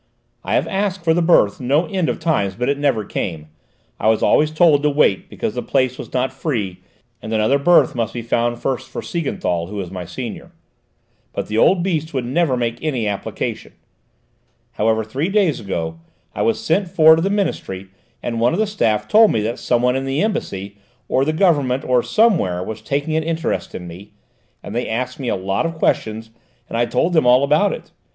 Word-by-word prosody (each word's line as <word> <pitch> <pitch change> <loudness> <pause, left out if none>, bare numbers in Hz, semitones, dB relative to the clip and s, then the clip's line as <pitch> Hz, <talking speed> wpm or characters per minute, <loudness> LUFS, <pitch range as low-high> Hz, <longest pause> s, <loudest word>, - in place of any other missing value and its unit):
"I - - -1
have - - +1
asked 195 -2 -2
for 165 -1 +3
the 175 - +1
berth 165 - +3
no 140 +7 +1
end 180 -1 -1
of - - -1
times, 135 - 0
but 125 +5 -1
it 140 0 0
never 130 -8 +1
came; 80 -6 -4 0.5
I - - 0
was 110 0 +3
always 150 - +4
told 155 -2 +4
to 150 - +2
wait 140 -10 +2
because - - -3
the - - -3
place 130 -2 0
was - - -8
not 130 +1 -1
free, 110 - -3 0.4
and 110 - -7
another 110 +6 +2
berth 175 +5 +4
must 115 -3 -2
be 120 - -5
found 120 +1 0
first 130 0 -3
for - - -6
Siegenthal, 90 - -2
who 105 - -8
was 95 -4 -5
my 90 -2 -6
senior. 110 +7 -7 0.8
But - - -4
the 110 +1 0
old 180 +5 +4
beast 160 -5 -2
would 130 -2 -1
never 135 0 +1
make 120 -1 -2
any 130 -9 -1
application. 100 -1 -4 1.0
However, 110 +1 +1
three 135 - -2
days 195 -6 +2
ago, 80 -5 -4 0.3
I - - -3
was 225 -1 +1
sent 205 -3 0
for 160 -3 +6
to 160 - -1
the 195 - 0
Ministry, 130 - -2 0.3
and 115 -1 -2
one 120 +2 +2
of - - -1
the 220 - +3
staff 110 - 0
told 220 0 +6
me 110 - 0
that 115 +3 -3
some 120 -1 +1
one 125 0 +3
in 135 0 -2
the 135 +6 0
Embassy, 100 - -3 0.3
or 130 - +2
the 155 - +1
Government, 145 -7 +2
or 125 -1 +3
somewhere, 155 - +2
was 110 +2 -6
taking 145 +6 -2
an 160 - +2
interest 165 0 -2
in 90 - -6
me, 95 +5 -11 0.5
and - - -7
they 120 +2 -2
asked 125 +6 -3
me 130 - -4
a - - +1
lot 95 - -1
of 165 - -6
questions 110 -6 -1 0.4
and - - -6
I 120 +1 +1
told 130 +9 0
them 155 -6 +3
all 125 +2 +6
about 150 +8 +3
it. - - -8
130 Hz, 210 wpm, -19 LUFS, 110-160 Hz, 1.0 s, for